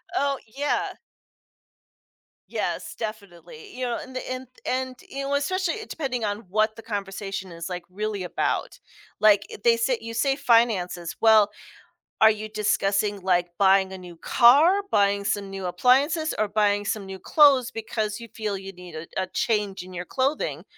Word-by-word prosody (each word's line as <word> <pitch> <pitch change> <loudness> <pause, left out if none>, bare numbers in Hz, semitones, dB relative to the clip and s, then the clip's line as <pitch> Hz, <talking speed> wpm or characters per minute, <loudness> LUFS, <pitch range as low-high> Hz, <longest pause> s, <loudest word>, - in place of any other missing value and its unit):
Oh, 280 -4 +1
yeah. 280 +6 -1 1.6
Yes, - - -3
definitely, 220 - -8
you 255 - -2
know. 240 -1 -1
And 260 - -12
the 255 - -4
nth 255 -1 -5 0.2
and, 260 0 -2
you 275 0 -5
know, 275 - -2
especially, 370 +4 0
eh 440 - -7
depending 255 -6 -3
on 205 +1 -2
what 215 +2 +1
the 225 - -10
conversation 195 -3 -5
is 170 0 -7
like 180 -1 -5
really 205 0 -3
about, 175 - -2 0.4
like 210 -1 +5
eh - - -8
they 230 -1 +5
say 235 +2 +1
you 230 0 -7
say 270 +4 +1
finances. 230 - +1
Well, 220 -2 +6 0.7
are 220 - +8
you 215 0 -3
discussing, 205 -1 0
like, 175 -1 +2
buying 190 -1 +4
a 190 - -7
new 175 -2 -11
car, 295 - +5
buying 200 0 +3
some 200 -1 -1
new 195 -1 -5
appliances, 275 - +2
or 215 - +2
buying 205 0 +1
some 205 0 -2
new 190 0 -8
clothes, 270 - +5
because 220 -1 -3
you 230 - -9
feel 210 -3 -3
you 195 0 -8
need 180 -1 -12
a 155 +1 -7 0.2
a - - -3
change 210 -5 0
in 185 +1 -11
your 180 0 -5
clothing? 270 +3 -1
215 Hz, 170 wpm, -25 LUFS, 195-255 Hz, 1.6 s, are